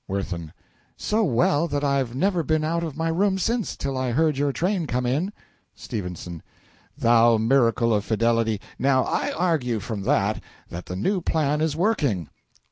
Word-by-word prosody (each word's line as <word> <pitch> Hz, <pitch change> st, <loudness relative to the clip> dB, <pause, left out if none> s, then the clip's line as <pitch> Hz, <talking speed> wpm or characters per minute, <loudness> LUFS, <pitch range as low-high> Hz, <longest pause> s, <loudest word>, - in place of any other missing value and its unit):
WIRTHIN. 90 Hz, -5 st, -4 dB, 0.5 s
So 220 Hz, +1 st, 0 dB
well 145 Hz, -, +2 dB
that 145 Hz, -2 st, -2 dB
I've 135 Hz, -4 st, 0 dB
never 180 Hz, +4 st, +1 dB
been 155 Hz, 0 st, 0 dB
out 170 Hz, +2 st, -1 dB
of 155 Hz, -4 st, -5 dB
my 165 Hz, 0 st, 0 dB
room 190 Hz, +4 st, +1 dB
since, 225 Hz, +3 st, -1 dB
till 135 Hz, -1 st, -3 dB
I 130 Hz, -2 st, -1 dB
heard 155 Hz, +2 st, +2 dB
your 140 Hz, +1 st, +1 dB
train 180 Hz, +2 st, -1 dB
come 125 Hz, 0 st, -1 dB
in. 150 Hz, +11 st, 0 dB, 0.5 s
S. -, -, -12 dB, 1.1 s
Thou 115 Hz, 0 st, +5 dB
miracle 115 Hz, 0 st, +3 dB
of 105 Hz, -2 st, +1 dB
fidelity! 115 Hz, -1 st, +1 dB, 0.2 s
Now 130 Hz, -1 st, +3 dB
I -, -, -1 dB
argue 155 Hz, -10 st, 0 dB
from 105 Hz, 0 st, -5 dB
that, -, -, +1 dB, 0.3 s
that 85 Hz, +1 st, -7 dB
the 90 Hz, -, -5 dB
new 185 Hz, -, 0 dB
plan 150 Hz, -2 st, 0 dB
is 155 Hz, -2 st, 0 dB
working. 150 Hz, -, 0 dB
140 Hz, 165 wpm, -24 LUFS, 115-165 Hz, 1.1 s, Thou